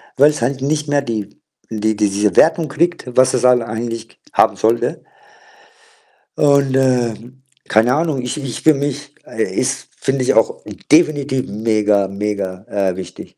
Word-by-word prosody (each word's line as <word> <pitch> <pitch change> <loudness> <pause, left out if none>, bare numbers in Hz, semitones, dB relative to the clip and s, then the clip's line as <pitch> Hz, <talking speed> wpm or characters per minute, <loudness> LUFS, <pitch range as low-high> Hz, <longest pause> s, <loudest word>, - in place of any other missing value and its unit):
weil's 145 +1 +3
halt 130 +3 -1
nicht 150 +2 -1
mehr 145 0 +1
die 110 -6 -6 0.3
die 110 0 0
diese 105 -2 0
Wertung 160 0 +4
kriegt, 170 +4 -1
was 130 +1 +3
es - - 0
halt 125 -1 +5
eigentlich 115 0 -6
haben - - +3
sollte. 115 +2 0 1.3
Und, 140 -2 +3
äh, 125 -3 +2 0.5
keine 110 +3 +3
Ahnung, 155 -4 -1
ich 125 +4 -4
ich 135 -5 -5
für 155 - +5
mich, 145 0 -4
äh, - - -3
ist - - -2
finde 135 -1 -1
ich - - +2
auch 115 - +1 0.3
definitiv 145 -5 +3
mega, 105 -2 +1
mega, 100 -2 -4
äh, 95 -3 -1
wichtig. 95 -1 -10
125 Hz, 150 wpm, -18 LUFS, 105-140 Hz, 1.3 s, halt